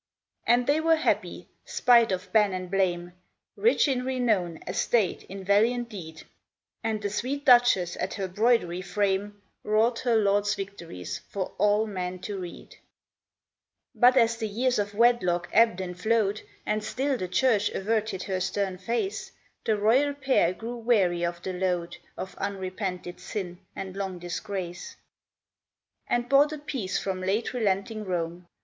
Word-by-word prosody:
And 240 +1 +4
they 290 +3 +3
were 325 0 +4
happy, 315 - -1 0.2
spite 235 -3 +4
of 185 0 -4
ban 210 -3 +4
and 185 -1 -5
blame, 175 -2 0 0.4
Rich 455 -7 +3
in 255 -3 0
renown, 225 -10 0
estate, 220 -6 +1
in 195 0 -8
valiant 230 +5 +2
deed; 160 -7 -9 0.6
And 220 -1 -1
the 205 -1 -2
sweet 270 +7 -3
Duchess 240 -9 +5
at - - -3
her 195 -1 -3
broidery 185 -3 +1
frame 205 +1 -1 0.2
Wrought 225 +3 +2
her 240 -2 +1
lord's 205 -1 +2
victories 170 - -6
for 190 -2 -4
all 210 +1 +3
men 185 -3 -4
to 200 -1 -5
read. 175 -2 -8
14 - - -25
CAEN - - -15 1.2
But 250 +1 +5
as 230 -2 +4
the 220 - -2
years 245 +3 0
of 205 0 -2
wedlock 205 -7 +3
ebbed 225 -5 +4
and 180 -1 -4
flowed, 215 -2 +1 0.2
And 215 0 -1
still 270 +5 -1
the 185 -7 -3
Church 210 +2 +2
averted 215 -1 -1
her 190 -1 -2
stern 190 0 -2
face, 235 - -3 0.3
The 220 -2 +2
royal 260 +8 +3
pair 265 -10 +2
grew 230 +6 -6
weary 200 -7 +2
of 170 0 -3
the 185 - -3
load 180 -2 -2 0.2
Of 190 - -6
unrepented 185 -2 -4
sin 180 -4 -5 0.2
and 190 -1 -6
long 195 -2 -4
disgrace, 175 0 -5 1.1
And 240 0 0
bought 280 +3 +5
a 305 - -4
peace 275 -10 -3
from 190 -1 -3
late 200 +7 -1
relenting 215 -1 -1
Rome. 175 -2 -3
205 Hz, 155 wpm, -27 LUFS, 185-235 Hz, 1.2 s, Duchess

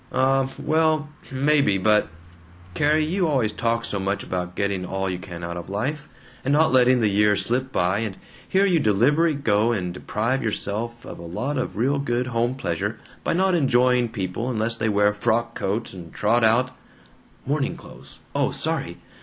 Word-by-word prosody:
"Um, 135 0 +2
well, 155 -1 +1 0.2
maybe, 140 -5 +2
but 105 +2 +3 0.7
Carrie, 150 - +2
you 180 +2 0
always 130 -8 +1
talk 115 +1 -1
so 100 - -2
much 100 +1 -2
about 90 -1 -4
getting 100 -2 -1
all 95 +1 -2
you 90 -1 -3
can 85 -2 -8
out 85 0 -4
of 85 +1 -7
life, 135 +10 -3 0.3
and 135 - 0
not 155 0 +4
letting 125 -1 +5
the 110 - +3
years 105 -1 +3
slip 130 +4 -1
by, 90 0 +1
and 110 -4 -4 0.3
here 195 +1 +3
you 180 -4 +3
deliberately 145 +9 +3
go 115 -4 +2
and 90 -6 -2
deprive 115 +8 -1
yourself 115 +2 -3
of - - -9
a - - -9
lot 130 - -3
of 100 -6 -4
real 135 +5 +1
good 125 -2 -1
home 120 0 0
pleasure 85 -11 -3 0.2
by - - 0
not 190 +2 +2
enjoying 125 -5 +3
people 105 +3 -3
unless 115 -1 -1
they 110 -1 -1
wear 105 0 +3
frock 115 +2 0
coats 105 +2 -3
and 85 -4 -10
trot 115 +3 +1
out 120 +3 +3 0.4
" - - -31
("Morning 140 0 -1
clothes. - - -14 0.2
Oh. - - +1
Sorry. - - -2
115 Hz, 180 wpm, -23 LUFS, 100-135 Hz, 0.7 s, letting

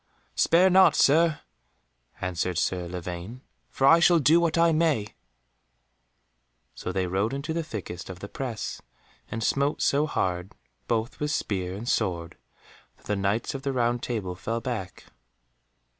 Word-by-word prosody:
"Spare 180 +3 +4
not, 190 +1 +6
Sir," 155 +1 +4 0.8
answered 90 -1 -2
Sir 90 0 -1
Lavaine, 90 +6 -6 0.3
"for 135 - 0
I 165 +4 +7
shall 175 0 +5
do 160 +3 +5
what 170 -1 +1
I 165 0 +5
may." 155 -10 +1 1.6
So - - -5
they 95 0 -1
rode 100 +7 -1
into 145 +4 -3
the 165 - -1
thickest 95 - -7
of 95 - -7
the 100 - -8
press, 120 -2 -5 0.5
and 115 0 -4
smote 140 +4 +1
so 145 +2 +2
hard 90 -8 -2 0.3
both 115 +2 -1
with 150 - -1
spear 95 -10 -2
and 110 +4 -7
sword 90 -7 -1 0.6
that - - -25
the 105 - -1
Knights 100 +4 -1
of 135 - -5
the 135 0 -2
Round 120 -1 +1
Table 105 -7 -3
fell 115 +6 -3
back. 115 -6 -5
115 Hz, 150 wpm, -26 LUFS, 95-150 Hz, 1.6 s, I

